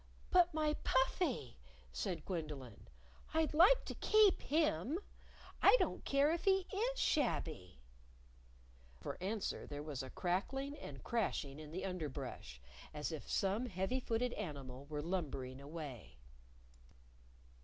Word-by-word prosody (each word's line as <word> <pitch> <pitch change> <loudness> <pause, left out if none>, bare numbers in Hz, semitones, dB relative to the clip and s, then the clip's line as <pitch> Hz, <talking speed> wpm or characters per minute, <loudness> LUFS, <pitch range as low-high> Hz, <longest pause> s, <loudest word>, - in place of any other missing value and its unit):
"But 360 -2 +6
my 305 -1 +1
Puffy!" 260 - +1 0.3
said 160 - -3
Gwendolyn. 150 - -5 0.5
"I'd 320 -1 +2
like 370 +11 +6
to - - -4
keep 430 -3 +5
him. 295 - +1 0.6
I - - +8
don't - - -1
care 280 +2 +4
if 335 - -2
he 385 -1 +4
is 485 +5 0
shabby." 155 - 0 1.2
For - - -5
answer 205 +2 -2
there 145 0 -5
was 150 -4 -4
a 130 - -6
crackling 265 - -1
and 135 - -9
crashing 155 -11 -1
in 155 -1 -8
the 180 +5 -4
underbrush, 145 - -5 0.4
as 150 +2 -2
if 155 - -6
some 200 +6 +1
heavy 190 +5 -1
footed 240 0 0
animal 140 -8 -6
were 150 -1 -3
lumbering 140 -7 -3
away. 140 - -8
185 Hz, 125 wpm, -37 LUFS, -, 1.2 s, I